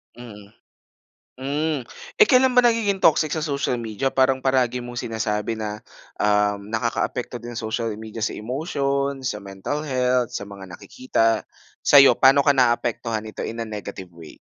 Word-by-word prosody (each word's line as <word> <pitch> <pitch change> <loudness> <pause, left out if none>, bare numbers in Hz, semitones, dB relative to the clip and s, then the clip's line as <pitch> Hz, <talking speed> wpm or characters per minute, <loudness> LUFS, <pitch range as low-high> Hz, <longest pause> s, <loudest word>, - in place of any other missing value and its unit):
Mm, 110 -4 -12 0.9
hmm. 150 +2 -1 0.4
Eh, 430 - +8
kailan 255 -1 +5
ba 250 - +6
nagiging 225 -5 +1
toxic 155 -1 +3
sa 160 - -2
social 140 -5 -1
media 115 +4 -2
parang 130 0 +2
palagi 130 -2 +2
mong 120 0 -6
sinasabi 110 -1 -2
na, 105 -1 -5 0.4
um, 105 -1 +1
nakakaapekto 120 +1 -2
din 120 -1 -8
social 115 +1 -2
media 110 +1 -8
sa - - -2
emotion, 140 +2 -2
sa 105 -5 -3
mental 100 +10 -5
health, 125 -4 0
sa 100 - -5
mga 100 -2 -11
nakikita, 115 +4 -1 0.4
sa'yo 140 -1 +7
pa'no 135 +1 +4
ka 145 - +5
naaapektuhan 120 -3 0
nito 110 - -7
in 115 - -5
a 115 - -3
negative 100 -4 -8
way? 85 -2 -13
120 Hz, 155 wpm, -23 LUFS, 110-140 Hz, 0.9 s, Eh